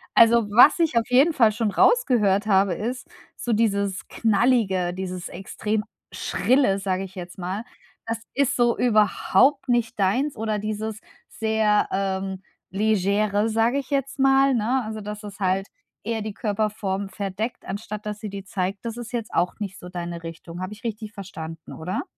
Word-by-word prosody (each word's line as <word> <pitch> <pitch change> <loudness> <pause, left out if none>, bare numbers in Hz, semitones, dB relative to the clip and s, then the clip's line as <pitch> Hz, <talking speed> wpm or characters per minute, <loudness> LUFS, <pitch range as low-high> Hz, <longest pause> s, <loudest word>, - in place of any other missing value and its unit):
Also, 230 -1 +6
was 245 +10 +7
ich 320 -7 +2
auf 230 - +2
jeden 270 +7 +5
Fall 230 -6 +5
schon 215 0 -1
rausgehört 220 - +3
habe, 195 -2 +3
ist, 245 +6 -4 0.3
so 240 - -2
dieses 200 -3 0
knallige, 215 -6 +2
dieses 185 -1 -5
extrem 210 +3 -3 0.3
schrille, 255 -6 +2
sage 190 -1 -1
ich 190 -1 -10
jetzt 180 -1 -8
mal, 185 +4 -4 0.4
das 230 0 -2 0.2
ist 280 -1 +1
so 240 -1 +2
überhaupt 245 +4 +3
nicht 240 -2 0
deins 250 +10 +1
oder 215 -1 -1
dieses 215 +1 -4 0.3
sehr, 220 -1 +1
ähm, 190 0 -2 0.3
legere, 205 +1 +1
sage 225 +4 +2
ich 275 -2 -4
jetzt 275 -1 -2
mal, 270 0 +5
ne? 245 +3 +1
Also, 220 0 -5
dass 210 +1 -7
es 205 0 -9
halt 190 0 0 0.4
eher 225 0 -2
die 215 0 -4
Körperform 205 -2 -2
verdeckt, 200 +4 -4
anstatt 210 +1 -6
dass 210 0 -4
sie 215 - -5
die 200 0 -7
zeigt, 195 +1 -3
das 230 -1 -3
ist 240 -2 -7
jetzt 235 -3 -4
auch 180 - +1
nicht 200 -3 -5
so 180 - -9
deine 175 -1 -5
Richtung. 165 +1 -8
Habe 185 +2 -4
ich 210 - -15
richtig 220 -1 -5
verstanden, 165 -5 -8
oder? 180 +4 -3
210 Hz, 170 wpm, -24 LUFS, 195-230 Hz, 0.4 s, was